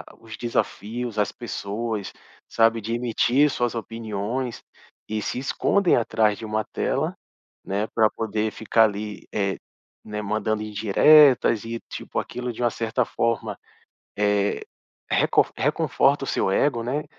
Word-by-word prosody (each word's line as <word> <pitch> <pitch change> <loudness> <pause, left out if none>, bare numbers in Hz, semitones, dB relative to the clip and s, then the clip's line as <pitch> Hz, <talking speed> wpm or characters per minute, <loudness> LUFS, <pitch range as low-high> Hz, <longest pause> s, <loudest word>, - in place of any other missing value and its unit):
a - - -20
os 110 -1 -10
desafios, 115 0 -3
as 105 - +1
pessoas, 105 0 -4 0.4
sabe, 115 0 +3
de 115 +2 -3
emitir 125 +4 +2
suas 120 -3 -1
opiniões 115 +2 -4 0.5
e 110 0 -2
se - - -3
escondem 175 +7 +2
atrás 110 -3 +1
de 115 - -8
uma 110 0 -1
tela, - - -1 0.5
né, 100 +3 -1
pra 110 -2 +5
poder 110 0 -2
ficar 110 +1 +3
ali, 105 0 -3
eh, 100 -2 0 0.5
né, 105 0 -5
mandando 110 +1 -1
indiretas 115 +4 +5
e, 115 0 -5
tipo, - - -5
aquilo 125 0 -4
de 120 - -6
uma 120 - +3
certa 115 +2 -1
forma, 115 0 -1 0.6
eh, 105 -1 +1 0.5
recon - - +3
reconforta - - +2
o - - -6
seu - - 0
ego, 120 +3 +2
né. 140 +6 -2
110 Hz, 140 wpm, -24 LUFS, 105-120 Hz, 0.6 s, pra